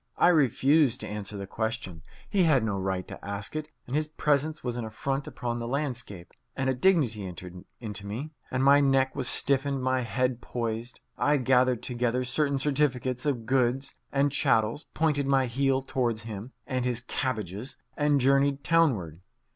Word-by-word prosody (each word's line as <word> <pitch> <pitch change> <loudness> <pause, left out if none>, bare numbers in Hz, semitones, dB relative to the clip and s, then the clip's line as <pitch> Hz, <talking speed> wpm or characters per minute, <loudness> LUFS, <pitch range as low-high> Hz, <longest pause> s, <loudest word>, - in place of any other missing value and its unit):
I - - +5
refused 140 -3 +3
to - - -4
answer 105 0 -5
the 100 - -5
question. 110 -5 -4 0.3
He 200 -2 +1
had 150 -8 +4
no 100 -3 -1
right 95 -1 -2
to - - -10
ask 100 +4 -5
it, 155 0 -4 0.2
and 125 - -4
his 155 0 +1
presence 150 0 0
was 120 -2 -2
an 120 - -3
affront 135 +6 -3
upon 120 -1 -4
the 115 - -4
landscape. 125 - -4 0.2
And 130 0 0
a - - 0
dignity 130 - +2
entered 90 0 -8
into 105 -3 -4
me, 125 +10 -5 0.2
and 130 +1 0
my 140 +1 +7
neck 135 -1 +2
was 135 -3 -2
stiffened, 140 -1 +2
my 130 0 +1
head 125 0 -1
poised. 115 0 -4 0.2
I 145 +1 +3
gathered 125 -2 +2
together 125 0 0
certain 140 +2 +1
certificates 135 -2 0
of 125 -6 -1
goods 130 +1 +1 0.2
and 140 +1 +2
chattels, 135 -1 +1
pointed 150 -3 +1
my 135 -1 +3
heel 135 +2 +1
towards 120 -4 -1
him 110 +2 -7
and 130 -1 -2
his 125 -1 -1
cabbages, 115 -3 -3 0.2
and 145 -1 +2
journeyed 140 +1 +3
townward. 110 - +2
130 Hz, 170 wpm, -28 LUFS, 115-140 Hz, 0.3 s, my